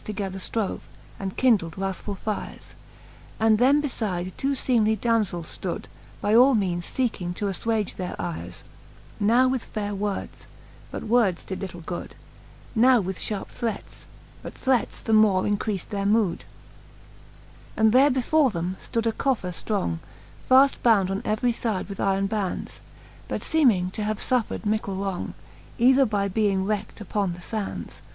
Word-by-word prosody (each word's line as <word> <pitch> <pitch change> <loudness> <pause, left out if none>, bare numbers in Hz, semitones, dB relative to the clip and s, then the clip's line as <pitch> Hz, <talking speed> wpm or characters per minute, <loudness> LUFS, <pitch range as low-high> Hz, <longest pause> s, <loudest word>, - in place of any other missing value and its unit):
Together 195 -2 -4
ftrove, 210 +2 -2 0.4
and 190 -1 -5
kindled 210 -11 +3
wrathfull 195 +1 -4
fires: 215 +1 -5 0.7
And 220 -1 +4
them 280 +4 +4
befide 185 -9 -3
two 275 +1 0
feemely 220 -5 +2
damzells 210 -8 0
ftood, 180 -3 -3 0.4
By 205 - +1
all 255 +3 +7
meanes 175 -4 -1
fecking 190 -9 -2
to 205 - -3
affwage 210 +2 -1
their 180 -1 -4
ires, 85 -1 -5 0.6
Now 235 +5 +4
with 255 -2 0
faire 205 -1 -4
words; 200 0 -4 0.4
but - - -6
words 215 -6 +2
did 190 - -6
little 175 -3 -6
good: 175 +1 -6 0.6
(mood. 225 - +1
Now 255 0 +6
with 190 -2 -3
fharpe 210 -2 -3
threats 230 -4 -5
j - - -16 0.3
but - - -8
threats 260 -2 0
the 225 - -1
more 210 -4 +5
increaft 205 -1 -1
their 200 -1 -1
V. 210 -4 +2 1.4
And 220 0 +5
there 265 +5 +6
before 270 +2 +3
them 180 -1 -3
ftood 230 -1 -2
a 225 - +3
coffer 225 -7 -1
ftrong, 170 - -2 0.5
Faft 265 +2 +6
bound 200 -5 +4
on 195 - -2
every 220 +3 +1
fide 225 -4 -2
with 200 -1 -8
iron 195 0 +1
bands, 200 -2 -3 0.5
But - - -3
feeming 230 - +3
to 210 - -4
have 215 0 -1
fuffred 245 -2 -1
mickle 210 -2 -1
wrong, 195 -1 -3 0.4
Either 260 +2 +5
by 200 -2 0
being 195 -1 +1
wreckt 210 +1 -3
upon 205 -3 -1
the 175 - -10
fands. 215 +2 -5
210 Hz, 155 wpm, -25 LUFS, 190-230 Hz, 1.4 s, all